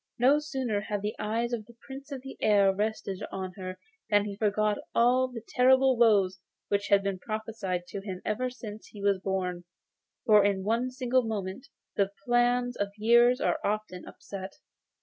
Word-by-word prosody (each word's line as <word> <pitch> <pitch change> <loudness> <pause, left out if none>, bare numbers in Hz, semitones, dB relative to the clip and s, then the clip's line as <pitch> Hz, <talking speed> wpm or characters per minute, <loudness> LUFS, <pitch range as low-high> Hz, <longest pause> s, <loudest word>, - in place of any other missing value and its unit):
No 265 +5 +5
sooner 265 -8 -2
had 205 -1 -4
the 210 - -2
eyes 230 +3 -1
of 220 -3 -3
the 235 - -16
Prince 275 +1 -9
of 265 -2 -6
the 270 - -8
Air 200 -2 +4
rested 205 -2 -3
on 185 -1 -5
her 185 -1 -6 0.3
than 205 -1 +3
he 205 -1 -5
forgot 210 0 +1 0.2
all 250 +2 +4
the 240 -3 -8
terrible 260 +1 +4
woes 200 -5 +3 0.3
which 200 0 0
had 200 -1 +4
been 195 -2 -2
prophesied 215 -4 -4
to 200 - -5
him 190 -2 -6
ever 250 +4 -1
since 220 -4 -9
he 205 -2 -11
was 200 -1 +2
born, 185 -2 -2 0.6
for 210 -2 +6
in 195 -1 +1
one 230 +5 0
single 255 0 +1
moment 220 +2 -4 0.3
the 195 -1 +2 0.2
plans 245 0 +2
of 205 - -1
years 235 +3 +5
are - - +1
often 210 -3 -2
upset. 190 -1 -8
215 Hz, 175 wpm, -28 LUFS, 200-245 Hz, 0.6 s, for